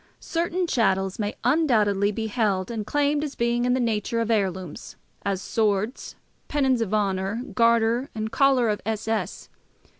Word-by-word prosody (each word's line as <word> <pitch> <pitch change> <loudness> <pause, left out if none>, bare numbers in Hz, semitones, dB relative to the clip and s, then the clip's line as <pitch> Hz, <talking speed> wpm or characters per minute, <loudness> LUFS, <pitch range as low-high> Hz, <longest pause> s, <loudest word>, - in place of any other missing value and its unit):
Certain 345 +2 -1
chattels 195 - +1
may 205 -1 -2
undoubtedly 220 -8 +2
be 220 +2 -3
held 210 -3 0
and 215 -3 -4
claimed 290 0 +1
as 295 -2 -5
being 235 +1 +1
in 250 0 +2
the - - 0
nature 230 -1 0
of 230 0 0
heirlooms, 185 -6 -2 0.3
as 195 -1 -2
swords, 215 +1 -1 0.3
pennons 265 -4 +1
of 215 -4 -2
honour, 200 +2 0
garter 235 +2 +3
and 220 0 -3
collar 270 -3 +3
of 210 -2 -1
S. 220 +1 -3
S. 225 -1 -3
225 Hz, 155 wpm, -25 LUFS, 205-250 Hz, 0.3 s, garter